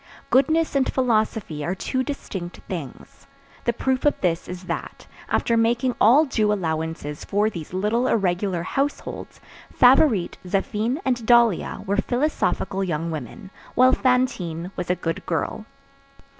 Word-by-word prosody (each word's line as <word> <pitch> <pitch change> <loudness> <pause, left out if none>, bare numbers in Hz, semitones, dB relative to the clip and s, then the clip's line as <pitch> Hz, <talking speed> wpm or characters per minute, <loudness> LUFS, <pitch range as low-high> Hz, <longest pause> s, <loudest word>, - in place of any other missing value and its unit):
Goodness 315 +5 +3
and 270 -1 +2
philosophy 220 - 0
are 175 +5 -2
two 260 +6 -2
distinct 195 - -5
things; 165 -9 -8 0.4
the - - +3
proof 260 +2 -1
of 295 - +2
this 170 -2 0
is 180 +1 -7
that, 180 - -6 0.2
after 235 - +1
making 235 +2 +2
all 275 +8 +6
due 215 -6 +1
allowances 160 -5 -3
for 210 +2 +1
these 165 -6 -8
little 210 +7 0
irregular 185 -4 0
households, 280 +7 -3 0.3
Favourite, 245 - +4
Zéphine, 210 +6 -1
and 245 -3 0
Dahlia 235 -5 +3
were 200 +1 0
philosophical 215 -6 0
young 165 -2 -2
women, 160 - -7 0.2
while 255 +1 +6
Fantine 190 -10 0
was 180 -1 -4
a 180 - +3
good 165 -2 -3
girl. - - -2
210 Hz, 135 wpm, -23 LUFS, 175-250 Hz, 0.4 s, all